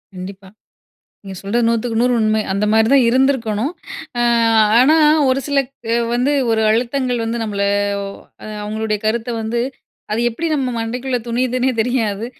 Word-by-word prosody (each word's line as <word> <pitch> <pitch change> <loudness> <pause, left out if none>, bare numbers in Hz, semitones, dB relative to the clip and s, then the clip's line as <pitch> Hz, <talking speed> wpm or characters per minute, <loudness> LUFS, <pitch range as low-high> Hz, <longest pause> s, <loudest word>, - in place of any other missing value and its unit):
கண்டிப்பா. 190 +1 -9 0.7
நீங்க 195 -1 -8
சொல்றது 230 +4 0
100/100 235 +1 +1
உண்மை. 215 0 +2
அந்த 200 +2 0
மாரிதா 220 +5 +4
இருந்திருக்கணும். 255 0 +1 0.5
அ, - - +2 0.6
ஆனா, 280 +6 +5 0.3
ஒரு 260 +1 +1
சில 285 -1 -1 0.4
அ - - +3 0.2
வந்து 250 +4 +1 0.2
ஒரு 220 -1 +1
அழுத்தங்கள் 245 +1 -1
வந்து 230 +1 -3
நம்மள 200 -2 -2 0.8
அ, - - -8 0.2
அவங்களுடைய 215 0 -2
கருத்த 225 +2 -1
வந்து 230 +2 -2 0.5
அது 225 - 0
எப்படி 315 +9 -4
நம்ம 265 -3 -1
மண்டைக்குள்ள 250 +3 -2
துணியிதுன்னே 250 +2 0
தெரியாது. 225 -3 -1
230 Hz, 135 wpm, -18 LUFS, 215-250 Hz, 0.8 s, ஆனா